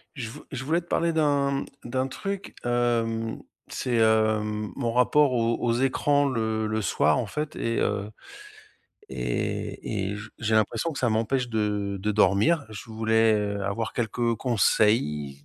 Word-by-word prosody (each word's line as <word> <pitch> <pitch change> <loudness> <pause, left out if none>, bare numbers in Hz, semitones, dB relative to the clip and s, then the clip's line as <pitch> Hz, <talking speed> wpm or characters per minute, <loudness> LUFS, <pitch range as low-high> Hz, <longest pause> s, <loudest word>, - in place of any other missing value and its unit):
Je 120 -5 -5
v - - -10
je 135 -1 -5
voulais 165 +5 +1
te - - -22
parler 170 -1 +1
d'un 140 -3 +1 0.2
d'un 130 +2 -1
truc, 195 +8 -5
hem, 115 -2 0 0.3
c'est, 125 -2 -2
hem, 110 -1 +2
mon 120 -4 -1
rapport 130 +3 +4
aux 115 -1 +1
aux 115 - +1
écrans 140 +3 +2
le 110 -3 -1
le 110 0 -1
soir, 85 -2 +2
en 120 - -1
fait 150 +7 -4
et 115 0 -1
heu 100 +1 -1 1.0
et 100 -2 -3
et 105 - -4
j 105 +1 -8
j'ai 110 -1 0
l'impression 110 +9 +1
que 140 - -6
ça 120 - +1
m'empêche 115 +3 0
de 105 -3 -1
de 105 +3 -1
dormir, 105 - +3
je 110 +1 -9
voulais 110 0 +3 0.3
avoir 100 +3 -2
quelques 120 0 0
conseils 100 - +1
115 Hz, 155 wpm, -26 LUFS, 110-130 Hz, 1.0 s, rapport